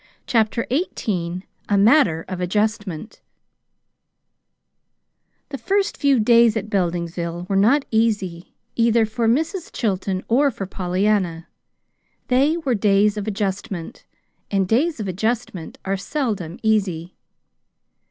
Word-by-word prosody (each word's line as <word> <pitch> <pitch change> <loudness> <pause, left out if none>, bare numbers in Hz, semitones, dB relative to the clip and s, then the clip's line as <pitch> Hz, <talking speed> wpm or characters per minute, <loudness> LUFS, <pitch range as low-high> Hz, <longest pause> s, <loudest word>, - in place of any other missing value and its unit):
CHAPTER 230 -1 +1
XVIII 185 - -2 0.3
A 205 - +3
MATTER 200 - +4
OF 185 -1 -5
ADJUSTMENT 205 -1 -2 2.3
The 275 - -6
first 400 +1 0
few 280 -4 +2
days 230 0 +5
at 215 0 -5
Beldingsville 175 -1 -2
were 195 - -1
not 240 +9 +4
easy 205 -6 -1 0.2
either 230 -1 +3
for 225 +1 -1
Mrs. 320 - 0
Chilton 190 -3 -2
or 275 +5 +3
for 225 -6 -5
Pollyanna. 185 -2 -1 0.8
They 275 +6 +3
were 285 -7 -1
days 205 -1 +3
of 210 0 -4
adjustment; 195 -4 -4 0.5
and 195 -2 +1
days 280 - +1
of 210 - -3
adjustment 200 -2 -3
are 195 +1 -1
seldom 200 - -3
easy. 185 -6 0
210 Hz, 115 wpm, -21 LUFS, 185-235 Hz, 2.3 s, days